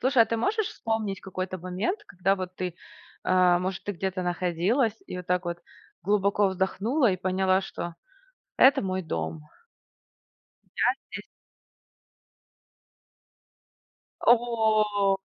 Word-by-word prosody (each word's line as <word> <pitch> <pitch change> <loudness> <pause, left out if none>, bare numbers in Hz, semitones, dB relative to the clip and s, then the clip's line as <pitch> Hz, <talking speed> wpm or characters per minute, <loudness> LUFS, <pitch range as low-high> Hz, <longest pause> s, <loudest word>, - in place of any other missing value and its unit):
Слушай, 255 -2 +5
а - - 0
ты 230 - -1
можешь 415 - 0
вспомнить 220 -3 -3
какой-то 185 0 -5
момент, 190 - -3
когда 195 - 0
вот 185 -1 -6
ты, 180 -2 -3 0.5
э, 180 -1 +4
может, 185 +1 -3
ты 205 - -2
где-то 190 0 -3
находилась 180 - +1
и - - -6
вот 180 -1 -7
так 180 0 +1
вот 175 0 -3 0.4
глубоко 200 +1 +2
вздохнула 205 - +1
и - - -1
поняла, 185 +1 +1
что 175 -3 -6 0.6
это 265 +1 +6
мой 190 -1 -2
дом? 160 -1 -4 1.3
Я - - +3 0.2
здесь - - -6 3.0
Э, - - +7
во. 215 -4 +2
190 Hz, 120 wpm, -27 LUFS, 180-220 Hz, 3.0 s, Э